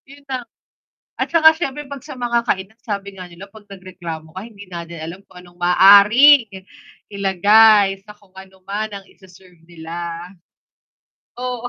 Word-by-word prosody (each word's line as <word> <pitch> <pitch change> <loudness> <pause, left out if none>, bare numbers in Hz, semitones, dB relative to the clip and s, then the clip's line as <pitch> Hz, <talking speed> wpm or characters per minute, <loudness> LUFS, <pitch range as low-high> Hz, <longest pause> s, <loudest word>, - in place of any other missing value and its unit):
Yun 280 +1 -16
na. 260 -1 -4 0.7
At - - -4
tsaka 320 -1 +5
siyempre 295 -3 -6
'pag 275 -1 -10
sa 285 -3 -11
mga 240 -1 -1
kainan, 200 +1 -4
sabi 200 -3 -6
nga 185 -2 -11
nila 175 +3 -12
'pag 205 0 -19
nagreklamo 175 -5 -10
ka, 190 - -7
hindi 205 -3 -13
natin 170 -2 -9
alam 165 +4 -9
kung 180 - -18
anong 175 0 -17
maaaring 210 +8 +6 0.6
ilagay 200 +1 +3
sa 210 +1 -16
kung 195 -2 -28
ano 190 0 -15
man 215 +2 -4
ang 200 -1 -10
ise-serve 185 -3 -21
nila. 170 +1 -8 1.1
Oo. 245 -1 -5
195 Hz, 155 wpm, -18 LUFS, 180-230 Hz, 1.1 s, maaaring